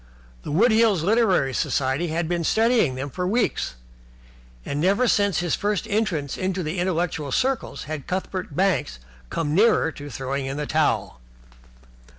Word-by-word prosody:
The - - -8
Wood 220 +11 +4
Hills 220 -6 +3
Literary 195 - +2
Society 135 +7 0
had 165 +1 -1
been 170 0 -1
studying 220 - +2
them 135 +2 -5
for 180 +3 -2
weeks, 215 - 0 0.9
and 145 +1 -2
never 200 +8 +3
since 200 -6 +2
his 175 -2 -1
first 205 -1 -1
entrance 195 -10 -1
into 185 -2 -2
intellectual 170 -4 -1
circles 260 - -1
had 150 -2 -6
Cuthbert 185 -4 -4
Banks 185 - +1 0.3
come 150 -2 -2
nearer 200 -3 +4
to 145 -1 -9
throwing 135 +2 -3
in 135 +1 -4
the 150 - -2
towel. 150 - 0
175 Hz, 150 wpm, -24 LUFS, 145-205 Hz, 0.9 s, Wood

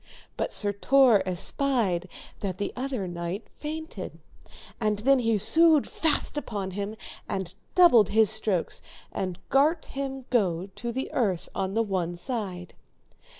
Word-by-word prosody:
But - - -2
Sir 205 -1 +1
Tor 250 0 +5
espied 185 -1 0 0.3
that 190 -3 -3
the 200 - -3
other 255 -6 -3
knight 175 +3 -5
fainted, 315 +2 -6 0.6
and 215 -3 +1
then 265 +5 +3
he 225 -3 +2
sued 305 - +5
fast 305 -2 +1
upon 200 -8 -5
him, 200 +3 -4 0.3
and 190 -2 -3 0.2
doubled 245 - +6
his 220 -1 +4
strokes, 215 -5 -1 0.3
and 185 -2 -3
gart 305 +5 +3
him 270 -1 -5
go 190 -5 +1
to 235 0 -4
the 265 +3 -4
earth 195 -8 0
on 195 +1 -2
the 230 - +3
one 180 -4 -2
side. 185 -3 -3
215 Hz, 140 wpm, -27 LUFS, 190-265 Hz, 0.6 s, doubled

